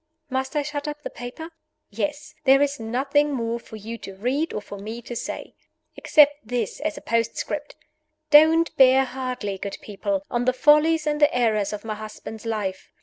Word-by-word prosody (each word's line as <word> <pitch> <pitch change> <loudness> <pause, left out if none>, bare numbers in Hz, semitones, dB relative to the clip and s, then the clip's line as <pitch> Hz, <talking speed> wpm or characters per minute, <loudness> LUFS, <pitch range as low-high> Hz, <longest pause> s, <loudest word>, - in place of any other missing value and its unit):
Must 265 +2 -2
I 295 - +1
shut 290 0 -4
up 295 0 -6
the - - -5
paper? 250 +8 -8 0.4
Yes. 295 +7 -3
There 270 0 +7
is 280 -2 -1
nothing 275 +6 +1
more 235 -2 -2
for 225 - -12
you 225 +2 -7
to 195 - -9
read 265 +10 -1
or - - -3
for 205 -1 -9
me 220 +4 -6
to 240 - -7
say. - - -5 0.4
Except 295 -1 +5
this 230 -2 -3
as 305 0 -2
a - - -8
postscript. 230 0 -2 0.6
Don't 320 +2 +6
bear 265 0 +6
hardly, 250 -7 -4
good 200 - -5
people, 290 +8 -3
on 240 0 0
the 255 - +3
follies 305 +4 +4
and 300 0 -1
the 295 - +6
errors 220 -5 +1
of 210 +1 -6
my 220 - -2
husband's 215 +1 -8
life. 200 -4 -3
255 Hz, 185 wpm, -24 LUFS, 220-295 Hz, 0.6 s, There